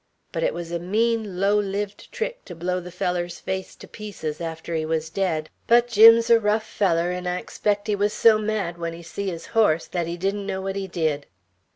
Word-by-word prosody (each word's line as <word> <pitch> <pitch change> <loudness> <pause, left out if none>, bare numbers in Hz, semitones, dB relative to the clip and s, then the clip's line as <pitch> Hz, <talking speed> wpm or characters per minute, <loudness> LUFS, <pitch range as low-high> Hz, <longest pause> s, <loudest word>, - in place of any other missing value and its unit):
But - - -3
it - - 0
was 170 -1 -6
a 170 - -1
mean, 215 +1 0
low 200 +2 +3
lived 200 0 -4
trick - - -4
to 175 - -9
blow 180 +2 -1
the 180 0 -8
feller's 175 -1 -2
face 190 0 -4
to - - -13
pieces 175 -7 -6
after 165 0 -5
he 160 -1 0
was 160 0 -2
dead; 165 -5 -1 0.2
but 240 +1 +5
Jim's 230 +1 +7
a 230 - +7
rough 215 +1 +1
feller, 175 -3 +1
'n' 180 0 -4
I 180 0 0
expect 205 +2 -1
he 210 -1 +1
was 205 +1 +1
so 220 -1 +5
mad, 210 -5 -2
when 165 -1 -3
he 170 +1 -10
see 200 +4 -5
his 165 -2 -6
horse, 190 -8 +3
that 175 -2 -3
he 170 +1 -4
didn't 195 +2 -2
know 190 -1 -2
what 195 0 -3
he 195 -1 -3
did." 155 -5 -1
190 Hz, 220 wpm, -24 LUFS, 170-210 Hz, 0.2 s, Jim's